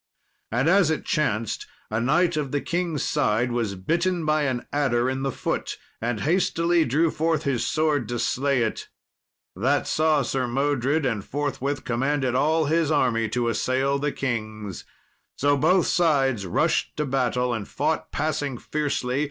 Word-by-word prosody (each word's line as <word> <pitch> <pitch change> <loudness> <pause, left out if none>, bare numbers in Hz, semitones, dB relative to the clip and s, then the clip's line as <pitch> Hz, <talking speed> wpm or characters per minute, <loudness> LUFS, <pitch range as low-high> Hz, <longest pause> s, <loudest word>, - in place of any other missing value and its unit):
And 125 +6 +1
as 185 -1 +4
it 160 - -1
chanced, 115 -7 -1 0.2
a 110 +1 0
knight 170 +7 +2
of 145 -3 -2
the 145 - +1
king's 170 -2 -2
side 120 -4 +1
was 115 -5 -1
bitten 170 - 0
by 155 -1 +2
an 130 -3 -2
adder 130 -4 +1
in 130 +1 -2
the 135 0 -1
foot, - - -3 0.2
and 115 -1 -2
hastily 170 0 +2
drew 155 +5 +2
forth 160 -1 0
his 135 -5 0
sword 150 -7 0
to 120 - -2
slay 135 +1 +1
it. 110 - -3 0.7
That 130 +10 +1
saw 155 -2 +2
Sir 130 0 -1
Modred, 140 +3 0
and 115 -6 -1
forthwith 145 +1 -3
commanded 130 +2 0
all 155 +5 +2
his 160 +1 +1
army 115 -7 +1
to 120 +2 -1
assail 130 +4 0
the 145 +1 -1
king's. 110 -7 -4 0.5
So 145 +1 +3
both 170 +6 +3
sides 135 - +2
rushed 85 - 0
to 150 - 0
battle, 125 -2 0
and 110 -4 -4
fought - - -2
passing 145 -3 -2
fiercely. 140 -2 -2
140 Hz, 160 wpm, -24 LUFS, 120-155 Hz, 0.7 s, as